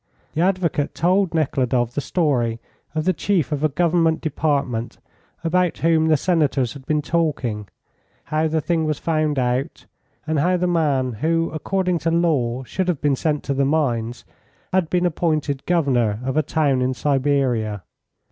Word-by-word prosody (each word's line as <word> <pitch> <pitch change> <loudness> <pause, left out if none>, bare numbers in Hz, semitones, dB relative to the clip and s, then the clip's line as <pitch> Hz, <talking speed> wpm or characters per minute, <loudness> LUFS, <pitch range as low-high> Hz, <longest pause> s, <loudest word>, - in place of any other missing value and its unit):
The 160 - 0
advocate 180 -5 0
told 180 +1 +2
Nekhludoff 125 -5 0
the 145 - -2
story 125 -7 0 0.4
of 155 0 -1
the 185 - +3
chief 175 -1 0
of 150 0 -2
a 155 - +3
Government 165 +1 +2
department, 140 -6 -1 0.5
about 180 +1 +1
whom 160 -1 +2
the 155 -1 +4
Senators 145 -7 +1
had 135 -2 -12
been 150 -1 +1
talking: 135 -12 -1 0.6
how 155 +1 0
the 160 0 0
thing 165 0 0
was 155 -2 -1
found 155 -3 0
out, 125 +1 -1 0.4
and 155 -1 0
how 180 +5 +2
the 180 - 0
man, 145 -7 +1
who 165 +1 +1
according 180 +2 -1
to 165 - -1
law 145 -8 +1
should 185 +9 -3
have 175 -6 0
been 145 -2 +2
sent 150 +1 -1
to 140 - -1
the 140 0 +1
mines, 125 -5 -1 0.5
had 185 -4 +2
been 180 0 +1
appointed 155 -5 -1
Governor 125 -11 +1
of 130 - -2
a 155 - +4
town 145 -3 +1
in 130 0 0
Siberia. 130 - 0
155 Hz, 165 wpm, -21 LUFS, 130-165 Hz, 0.6 s, the